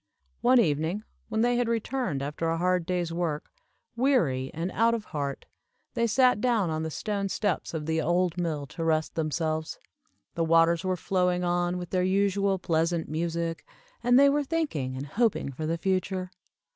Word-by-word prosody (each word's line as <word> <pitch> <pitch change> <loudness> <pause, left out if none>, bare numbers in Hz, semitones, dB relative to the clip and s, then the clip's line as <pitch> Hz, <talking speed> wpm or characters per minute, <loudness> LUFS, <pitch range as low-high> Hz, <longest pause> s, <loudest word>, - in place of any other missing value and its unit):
One 250 +1 +5
evening, 165 +2 +1 0.3
when 220 - 0
they 240 +1 +3
had 245 -1 +1
returned 230 - -1
after 150 +3 -2
a 165 - 0
hard 180 -1 +1
day's 175 -2 -1
work, 165 -3 -2 0.4
weary 170 - +2
and 165 +4 -3
out 230 +2 +3
of 220 -2 -5
heart, 140 -2 -3 0.5
they 235 -1 +1
sat 250 -1 +3
down 225 -9 +2
on 155 0 -2
the 160 - -2
stone 200 +4 -2
steps 190 -4 -1
of 155 -1 -3
the 160 0 0
old 175 +1 +1
mill 160 -5 -2
to 165 +4 -6
rest 160 -1 +1
themselves. 155 0 -2 0.6
The 165 - 0
waters 165 +1 +4
were 185 -1 0
flowing 180 0 0
on 175 0 0
with 175 -1 -7
their 185 - +1
usual 195 +1 +2
pleasant 165 -1 0
music, 165 +1 -2 0.4
and 245 0 +5
they 280 - +7
were 290 +1 +2
thinking 265 - -2
and 135 - -4
hoping 210 - 0
for 155 +4 -4
the 165 +1 0
future. 185 0 -1
175 Hz, 175 wpm, -27 LUFS, 160-210 Hz, 0.6 s, they